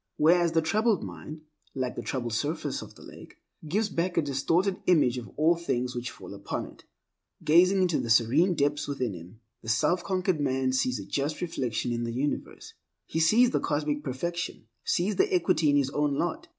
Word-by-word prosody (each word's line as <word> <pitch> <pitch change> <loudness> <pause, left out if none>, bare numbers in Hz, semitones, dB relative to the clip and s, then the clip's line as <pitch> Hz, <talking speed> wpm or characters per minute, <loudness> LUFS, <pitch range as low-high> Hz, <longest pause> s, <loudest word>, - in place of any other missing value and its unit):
Whereas, 170 +2 +4
the 165 -1 +2
troubled 215 +5 +1
mind, 155 +1 -8 0.3
like 130 -2 -2
the - - -4
troubled 120 -4 -3
surface 150 +8 -2
of - - -11
the - - -15
lake, - - -13 0.3
gives 205 +7 +1
back 175 -2 -2
a 165 - +4
distorted 165 +8 +1
image 140 -8 +3
of 115 - -10
all 160 +3 +4
things 125 -7 -2
which 120 0 -3
fall 95 0 -11
upon 100 0 -4
it. - - -15 0.6
Gazing 185 +5 +5
into 175 -4 +1
the 115 - -3
serene 130 +11 +4
depths 145 -1 0
within 130 -6 -2
him, 90 +6 -12 0.2
the 110 - -7
self 150 +10 +2
conquered 185 -3 0
man 130 -2 0
sees 125 -1 +1
a 100 - -7
just 145 +6 -2
reflection 125 -8 -2
of 120 0 -2
the 115 - -4
universe. 140 +4 -4 0.3
He 160 - -3
sees 230 +10 +5
the - - +1
Cosmic 150 -1 -1
Perfection; 170 +1 -4 0.2
sees 190 +4 0
the 400 +2 +2
equity 180 - +2
in 145 - +3
his 135 -1 +1
own 145 -1 0
lot. 310 - -2
150 Hz, 190 wpm, -28 LUFS, 125-175 Hz, 0.6 s, Gazing